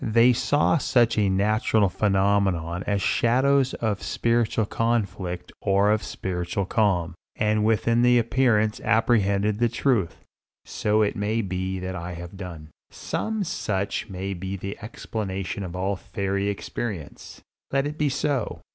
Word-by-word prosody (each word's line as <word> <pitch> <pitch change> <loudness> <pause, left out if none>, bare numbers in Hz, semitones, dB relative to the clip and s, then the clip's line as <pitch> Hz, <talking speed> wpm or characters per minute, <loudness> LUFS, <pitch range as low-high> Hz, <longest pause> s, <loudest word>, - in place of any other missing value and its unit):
They 115 +3 +5
saw 145 +6 +2
such 120 -4 +2
natural 105 +1 +2
phenomena 95 -3 +1
as 100 -2 0
shadows 130 +3 +2
of 105 -4 -2
spiritual 115 -1 +1
conflict 100 -6 -2
or 100 +1 +3
of 110 0 +2
spiritual 90 0 -3
calm, 95 -6 +1 0.2
and 105 0 +1
within 115 +2 +2
the 125 0 +5
appearance 115 -3 +2
apprehended 105 -2 +2
the 120 0 +3
truth. 120 -6 0 0.4
So 105 +1 +1
it 105 - 0
may 105 +3 0
be 95 0 -3
that 95 0 -4
I 90 +1 -5
have 85 +2 -8
done. 85 -5 -8 0.2
Some 220 -2 -3
such 105 - -2
may 95 +1 -4
be 95 +1 -5
the 100 +1 -5
explanation 100 -3 -4
of 90 -2 -6
all 95 +2 -1
fairy 100 +1 -2
experience. 100 -4 -6 0.3
Let 135 0 +1
it 150 +2 -5
be 150 -1 +2
so. 140 -3 -1
105 Hz, 140 wpm, -25 LUFS, 95-115 Hz, 0.4 s, They